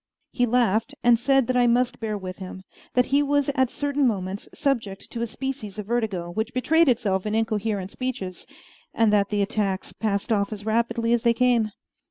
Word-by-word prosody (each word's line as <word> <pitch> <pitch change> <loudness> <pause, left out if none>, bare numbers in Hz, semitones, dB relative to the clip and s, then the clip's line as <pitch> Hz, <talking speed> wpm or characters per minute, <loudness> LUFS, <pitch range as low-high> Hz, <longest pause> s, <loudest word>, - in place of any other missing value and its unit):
He 245 -1 +1
laughed, 235 +2 +1
and 235 -1 +5
said 270 +1 +3
that 255 - -1
I 245 -1 +4
must 245 +1 +2
bear 215 -2 -2
with 185 -2 -7
him; 185 0 -8 0.3
that 250 -1 +4
he 285 - +5
was 285 0 +1
at 260 -3 +2
certain 285 -1 0
moments 195 -2 -3
subject 230 -9 -2
to 230 - -4
a 235 - 0
species 230 -4 -5
of 210 - -5
vertigo, 205 -7 -2
which 220 +6 -3
betrayed 320 +5 +4
itself 215 -5 +1
in 210 - -1
incoherent 215 -3 -1
speeches, 250 -8 -5 0.5
and 225 -3 +3
that 200 -1 +3
the 205 -1 +1
attacks 200 -2 -2
passed 210 +1 -2
off 200 -1 +1
as 205 -1 -6
rapidly 230 +1 +1
as 240 - +2
they 235 0 +3
came. 240 -3 +3
225 Hz, 195 wpm, -25 LUFS, 205-250 Hz, 0.5 s, and